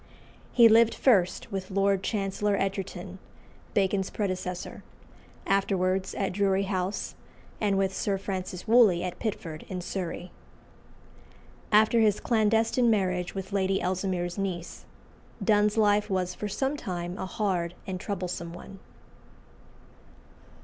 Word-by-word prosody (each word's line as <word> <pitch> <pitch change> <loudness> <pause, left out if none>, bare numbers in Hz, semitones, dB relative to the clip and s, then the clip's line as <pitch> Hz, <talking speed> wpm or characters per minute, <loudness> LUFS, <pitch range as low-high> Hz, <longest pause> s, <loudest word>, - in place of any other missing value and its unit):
He 235 -2 +7
lived 225 +1 +5
first 205 -3 +2
with 190 -1 -4
Lord 195 0 +2
Chancellor 200 0 -1
Egerton, 195 0 -4 0.6
Bacon's 195 -1 +1
predecessor, 185 -3 -4 0.6
afterwards 190 -1 +1
at 195 - -1
Drury 195 0 +2
House 190 0 -2 0.5
and 200 -2 +2
with 190 0 0
Sir 200 -1 0
Francis 190 0 -5
Wooley 215 -7 +5
at 180 -1 -5
Pitford, 165 -8 -4
in 185 - -4
Surrey. 180 0 -5 1.4
After 220 +2 +5
his 215 -2 +3
clandestine 225 +2 +2
marriage 185 -4 0
with 195 +1 -5
Lady 195 -1 +1
Ellesmere's 180 0 -2
niece, 180 -3 -4 0.6
Donne's 210 +1 +3
life 210 -1 +3
was 185 -2 -1
for 210 - -5
some 265 +8 -1
time 175 -8 -4
a 190 - -3
hard 180 -4 -1
and 185 -1 -4
troublesome 180 -4 -4
one. 195 +2 -11
195 Hz, 120 wpm, -28 LUFS, 185-210 Hz, 1.4 s, He